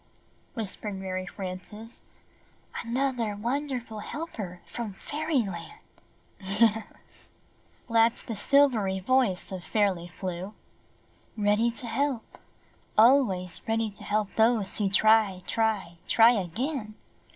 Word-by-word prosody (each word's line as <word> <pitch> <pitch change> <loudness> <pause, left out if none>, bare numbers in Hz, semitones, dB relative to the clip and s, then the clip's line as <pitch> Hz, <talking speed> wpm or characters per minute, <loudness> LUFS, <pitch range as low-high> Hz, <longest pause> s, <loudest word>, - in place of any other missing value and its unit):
whisper 215 -2 -4
ed 205 - -3
Mary 185 -1 -4
Frances, 195 +5 -7 0.7
''another 235 -3 -1
wonder 265 +4 -1
ful 220 -2 -9
helper 210 - -6
from 230 -4 -5
Fairyland!" 270 - -3 0.6
"Yes," 210 +2 -1 0.6
laughed 230 0 +3
the 225 - -4
silvery 220 -6 +3
voice 215 -3 +1
of 185 -2 -5
Fairly 185 -2 +1
Flew. 185 +2 -6 0.8
"Ready 210 +3 +3
to 235 +1 -5
help, 255 +1 -2 0.6
always 215 -7 +4
ready 225 -1 0
to 200 - -12
help 210 -1 0
those 220 -3 +2
who 200 -2 +2
try, 215 -1 +4
try, 210 -7 -1
try 230 +1 +7
again. 215 - -2
215 Hz, 105 wpm, -28 LUFS, 190-235 Hz, 0.8 s, try